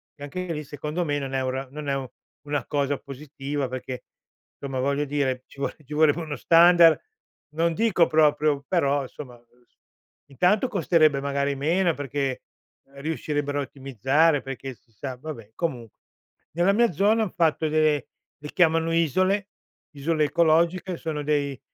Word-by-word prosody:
e 145 Hz, -, -11 dB
anche 180 Hz, +5 st, -5 dB
lì 150 Hz, -2 st, -4 dB
secondo 150 Hz, +4 st, -4 dB
me 145 Hz, -1 st, -1 dB
non 135 Hz, -1 st, -5 dB
è 135 Hz, -, 0 dB
un 130 Hz, -, -1 dB
ra 135 Hz, +1 st, -4 dB
non 150 Hz, +2 st, -7 dB
è 135 Hz, -1 st, -2 dB, 0.4 s
una 145 Hz, -3 st, -2 dB
cosa 145 Hz, -1 st, -1 dB
positiva 140 Hz, 0 st, -5 dB
perché, 130 Hz, 0 st, -6 dB, 0.5 s
insomma, 135 Hz, -2 st, -5 dB
voglio 140 Hz, +2 st, 0 dB
dire, 135 Hz, -3 st, -1 dB
ci -, -, -17 dB
vo 140 Hz, -, -1 dB
ci 145 Hz, -, -9 dB
vorrebbe 155 Hz, +1 st, +3 dB
uno 155 Hz, -3 st, -5 dB
standard, 170 Hz, +1 st, +6 dB, 0.5 s
non 165 Hz, +2 st, 0 dB
dico 205 Hz, -6 st, +3 dB
proprio, 150 Hz, -2 st, +2 dB
però 145 Hz, -6 st, +1 dB
insomma 125 Hz, -2 st, -10 dB, 0.9 s
intanto 180 Hz, -, +2 dB
costerebbe 155 Hz, -6 st, +3 dB
magari 140 Hz, 0 st, -1 dB
meno, 170 Hz, +7 st, +1 dB
e -, -, -4 dB
perché 140 Hz, -2 st, -3 dB, 0.5 s
riuscirebbero 145 Hz, -1 st, -2 dB
a -, -, 0 dB
ottimizzare, 135 Hz, +3 st, +1 dB
perché 135 Hz, 0 st, -6 dB
si 115 Hz, -, -35 dB
sa 130 Hz, +4 st, -6 dB
vabbè, 125 Hz, -6 st, -9 dB
comunque 125 Hz, -, -4 dB, 0.5 s
nella 175 Hz, +4 st, +3 dB
mia 235 Hz, +3 st, +3 dB
zona 210 Hz, +7 st, +3 dB
han 200 Hz, -, -3 dB
fatto 160 Hz, -2 st, +1 dB
delle 155 Hz, -2 st, +2 dB, 0.3 s
le 150 Hz, 0 st, -8 dB
chiamano 165 Hz, -2 st, +3 dB
isole, 185 Hz, +5 st, +1 dB, 0.5 s
isole 155 Hz, +2 st, +1 dB
ecologiche, 170 Hz, +4 st, +2 dB
sono 155 Hz, -3 st, -4 dB
dei 140 Hz, -3 st, -1 dB
145 Hz, 155 wpm, -25 LUFS, 140-165 Hz, 0.9 s, standard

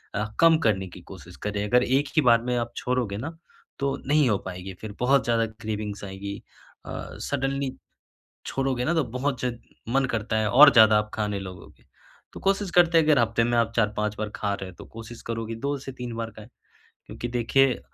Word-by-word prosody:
अ, 105 Hz, +1 st, 0 dB, 0.2 s
कम 165 Hz, -1 st, +7 dB
करने 95 Hz, -3 st, +1 dB
की -, -, -12 dB
कोशिश -, -, -12 dB
करें। 105 Hz, 0 st, -2 dB
अगर 125 Hz, +3 st, +4 dB
एक 135 Hz, +3 st, +1 dB
ही 155 Hz, -, +7 dB
बार 115 Hz, -, +5 dB
में 125 Hz, 0 st, -1 dB
आप 120 Hz, 0 st, -3 dB
छोड़ोगे 125 Hz, -5 st, -1 dB
ना 165 Hz, +1 st, -7 dB, 0.4 s
तो 140 Hz, 0 st, 0 dB
नहीं 150 Hz, -2 st, +4 dB
हो 105 Hz, -, +2 dB
पाएगी 95 Hz, +1 st, -6 dB
फिर 110 Hz, -1 st, -7 dB
बहुत 135 Hz, +2 st, +3 dB
ज़्यादा 115 Hz, -1 st, +2 dB
क्रेविंग्स 110 Hz, -2 st, -5 dB
आएगी। 100 Hz, +1 st, -6 dB, 0.4 s
अ, -, -, -7 dB, 0.3 s
सडन्ली 135 Hz, -1 st, -1 dB, 0.8 s
छोड़ोगे 135 Hz, -2 st, -1 dB
ना, 170 Hz, -, +1 dB
तो 160 Hz, -, +2 dB
बहुत 130 Hz, +3 st, -2 dB
ज 125 Hz, -, 0 dB, 0.4 s
मन 135 Hz, +2 st, +2 dB
करता 110 Hz, 0 st, -1 dB
है 110 Hz, -1 st, +1 dB
और 145 Hz, +6 st, +9 dB
ज़्यादा 110 Hz, -3 st, +7 dB
आप 105 Hz, 0 st, -2 dB
खाने 105 Hz, -2 st, -1 dB
लगोगे। 90 Hz, -10 st, -11 dB, 0.5 s
तो -, -, -9 dB
कोशिश 195 Hz, -1 st, 0 dB
करते, 170 Hz, -1 st, +5 dB
अगर 155 Hz, -4 st, +4 dB
हफ्ते 115 Hz, 0 st, +2 dB
में 120 Hz, 0 st, +1 dB
आप 115 Hz, 0 st, +1 dB
4-5 105 Hz, -1 st, 0 dB
बार 105 Hz, -1 st, -3 dB
खा 105 Hz, -1 st, -1 dB
रहे 95 Hz, -, -6 dB
हैं 95 Hz, -, -12 dB
तो -, -, -11 dB
कोशिश 115 Hz, +1 st, -10 dB
करो 115 Hz, -1 st, -3 dB
कि 115 Hz, -, -5 dB
2 140 Hz, +4 st, -2 dB
से 135 Hz, 0 st, -8 dB
3 125 Hz, -2 st, -6 dB
बार 115 Hz, -1 st, -4 dB
खाएँ। 110 Hz, +1 st, -12 dB, 0.6 s
क्योंकि 120 Hz, -, -6 dB
देखिए 125 Hz, +2 st, +2 dB
115 Hz, 205 wpm, -25 LUFS, 105-135 Hz, 0.8 s, और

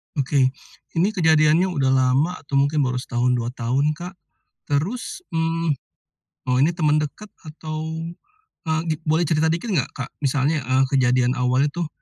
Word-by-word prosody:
Oke, 135 Hz, -2 st, +2 dB, 0.4 s
ini 180 Hz, +5 st, +2 dB
kejadiannya 160 Hz, -2 st, +4 dB
udah 140 Hz, -8 st, 0 dB
lama 135 Hz, +7 st, +2 dB
atau 140 Hz, -, -16 dB
mungkin 140 Hz, +1 st, +2 dB
baru 125 Hz, -1 st, -1 dB
setahun, 125 Hz, +1 st, 0 dB
2 120 Hz, -1 st, -1 dB
tahun 135 Hz, +5 st, 0 dB
Kak? 180 Hz, +2 st, -7 dB, 0.6 s
Terus, 210 Hz, -, -2 dB
mmm, 165 Hz, -1 st, 0 dB, 0.7 s
oh 125 Hz, 0 st, +2 dB
ini 160 Hz, -, +3 dB
teman 155 Hz, -3 st, +2 dB
dekat? 210 Hz, +8 st, -7 dB, 0.2 s
Atau, 155 Hz, +1 st, -5 dB, 0.7 s
eee, 160 Hz, 0 st, +1 dB, 0.2 s
boleh 160 Hz, +2 st, +2 dB
cerita 160 Hz, +1 st, +2 dB
dikit 170 Hz, +8 st, -2 dB
nggak 150 Hz, -10 st, 0 dB
Kak, 125 Hz, -3 st, -6 dB
misalnya, 140 Hz, +2 st, +1 dB
eee, 130 Hz, +1 st, +2 dB
kejadian 130 Hz, -1 st, +2 dB
awalnya 130 Hz, +3 st, +2 dB
tuh, 170 Hz, -2 st, -2 dB
150 Hz, 150 wpm, -22 LUFS, 130-165 Hz, 0.7 s, kejadiannya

